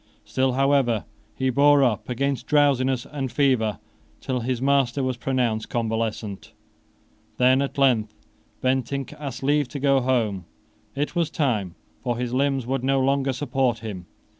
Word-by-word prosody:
Still, 130 Hz, -1 st, 0 dB
however, 135 Hz, -4 st, +2 dB, 0.3 s
he 130 Hz, 0 st, 0 dB
bore 145 Hz, +2 st, +5 dB
up 120 Hz, -4 st, 0 dB
against 135 Hz, +2 st, -1 dB
drowsiness 135 Hz, -3 st, +2 dB
and 135 Hz, -3 st, -4 dB
fever 125 Hz, -6 st, +1 dB, 0.4 s
till 130 Hz, -2 st, -2 dB
his 125 Hz, +1 st, -2 dB
master 135 Hz, -1 st, +2 dB
was 130 Hz, -1 st, -1 dB
pronounced 120 Hz, -3 st, -1 dB
convalescent. 110 Hz, -3 st, -3 dB, 0.8 s
Then, 130 Hz, +2 st, +4 dB
at 140 Hz, +1 st, -3 dB
length, 120 Hz, -6 st, +3 dB, 0.5 s
Bentinck 130 Hz, +1 st, -1 dB
asked 135 Hz, -4 st, -6 dB
leave 145 Hz, 0 st, +2 dB
to 140 Hz, +3 st, -6 dB
go 140 Hz, 0 st, +3 dB
home. 115 Hz, -8 st, 0 dB, 0.5 s
It 145 Hz, +2 st, -2 dB
was 170 Hz, -3 st, +1 dB
time: 110 Hz, -, -1 dB, 0.3 s
for 120 Hz, -2 st, -2 dB
his 125 Hz, 0 st, -3 dB
limbs 135 Hz, -1 st, +1 dB
would 130 Hz, 0 st, -2 dB
no 135 Hz, +1 st, +2 dB
longer 135 Hz, +1 st, +1 dB
support 130 Hz, -2 st, 0 dB
him. 95 Hz, -5 st, -6 dB
130 Hz, 145 wpm, -24 LUFS, 120-140 Hz, 0.8 s, bore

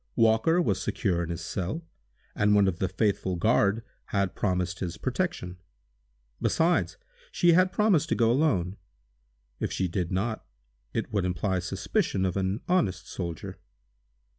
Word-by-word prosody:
Walker 115 Hz, +10 st, +4 dB
was 100 Hz, -, +1 dB
secure 90 Hz, -1 st, 0 dB
in 85 Hz, -, -3 dB
his 85 Hz, 0 st, -4 dB
cell, 100 Hz, -, -3 dB, 0.5 s
and 105 Hz, 0 st, +3 dB
one 100 Hz, -1 st, +5 dB
of 90 Hz, -3 st, -1 dB
the 95 Hz, -, 0 dB
faithful 95 Hz, -1 st, 0 dB
guard 105 Hz, +2 st, +2 dB, 0.2 s
had 100 Hz, -2 st, -1 dB
promised 90 Hz, -2 st, -1 dB
his 90 Hz, -3 st, -4 dB
protection. 130 Hz, -, -2 dB, 0.8 s
Besides, 170 Hz, +2 st, +2 dB, 0.3 s
she 175 Hz, -2 st, +4 dB
had 185 Hz, +2 st, +4 dB
promised 190 Hz, -8 st, +2 dB
to -, -, +2 dB
go 115 Hz, -1 st, +3 dB
alone. 105 Hz, -, +1 dB, 0.8 s
If -, -, -2 dB
she 95 Hz, -, 0 dB
did 90 Hz, +1 st, -2 dB
not, 110 Hz, +4 st, -1 dB, 0.5 s
it -, -, -3 dB
would 100 Hz, -3 st, +1 dB
imply 90 Hz, +1 st, 0 dB
suspicion 90 Hz, +2 st, -1 dB
of 90 Hz, -, -1 dB
an 95 Hz, +3 st, -1 dB
honest 100 Hz, -, 0 dB
soldier. 85 Hz, -4 st, -5 dB
100 Hz, 145 wpm, -27 LUFS, 90-120 Hz, 0.8 s, one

